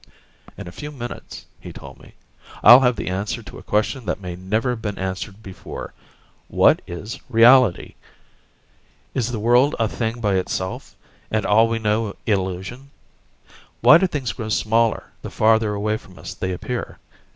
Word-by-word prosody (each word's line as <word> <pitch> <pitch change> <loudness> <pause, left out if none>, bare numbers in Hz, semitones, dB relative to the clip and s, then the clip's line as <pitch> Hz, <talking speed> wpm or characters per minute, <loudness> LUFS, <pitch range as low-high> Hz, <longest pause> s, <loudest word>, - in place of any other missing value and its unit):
"In - - -8
a - - -8
few 150 +11 -8
minutes," 120 -4 -8
he - - -10
told - - -12
me, - - -18 0.5
"I'll 120 +2 +10
have 125 -2 +2
the - - -5
answer 95 +3 -3
to - - -11
a - - -12
question 110 +5 -1
that 90 - -2
may 90 -2 -6
never 110 +7 -1
have 120 -2 -5
been 105 -2 -4
answered 95 +3 -5
before: 95 -3 -9 0.5
what - - +4
is 100 +6 -7
reality? 115 -3 +5 1.2
Is 120 -2 -1
the 120 - -3
world 120 +6 +3
a 115 - +2
thing 115 +2 -3
by 100 -4 +1
itself, 95 0 -4 0.3
and 110 -1 -1
all 110 +2 +4
we 115 0 -1
know 105 -1 -1
illusion? 95 +6 -3 0.9
Why - - +8
do 190 - +2
things 135 - -3
grow 110 -1 -6
smaller 115 +1 +1 0.2
the - - -7
farther 110 -1 +2
away 105 +1 -1
from 95 -4 -17
us - - -8
they 95 - -4
appear? 120 +7 -5
110 Hz, 165 wpm, -21 LUFS, 95-120 Hz, 1.2 s, I'll